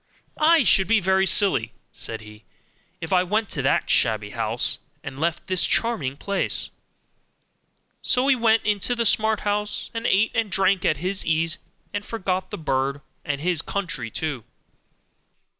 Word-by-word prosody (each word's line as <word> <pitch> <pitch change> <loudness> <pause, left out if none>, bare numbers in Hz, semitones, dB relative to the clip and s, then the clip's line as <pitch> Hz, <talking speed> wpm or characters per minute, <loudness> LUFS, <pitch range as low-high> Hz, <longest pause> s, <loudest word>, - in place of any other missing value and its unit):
'I 320 -1 +5
should 190 -4 +4
be 225 +1 +4
very 190 0 +2
silly,' 120 - +2 0.2
said 110 -1 -2
he, 105 0 -14 0.6
'if 165 - -3
I 180 - +5
went 210 +4 -1
to 140 - -2
that 135 +2 +1
shabby 110 -3 +2
house, 115 0 -1 0.2
and 135 -1 -8
left 165 +1 -1
this 185 -2 +1
charming 155 - +1
place'; 200 +5 0 1.3
so 250 +1 +1
he 275 - +5
went 225 -2 +2
into 210 +3 +1
the 235 -1 0
smart 220 0 +2
house, 210 0 -2
and 230 0 -2
ate 205 +3 +3
and 225 -4 -1
drank 190 0 +2
at 155 - +2
his 185 +5 -2
ease, 165 +1 0 0.3
and 205 - -3
forgot 190 -4 -3
the - - -6
bird, 140 -2 -1 0.2
and 145 -1 -3
his 175 -1 +1
country 165 - -3
too. 140 -1 -4
185 Hz, 160 wpm, -23 LUFS, 140-210 Hz, 1.3 s, I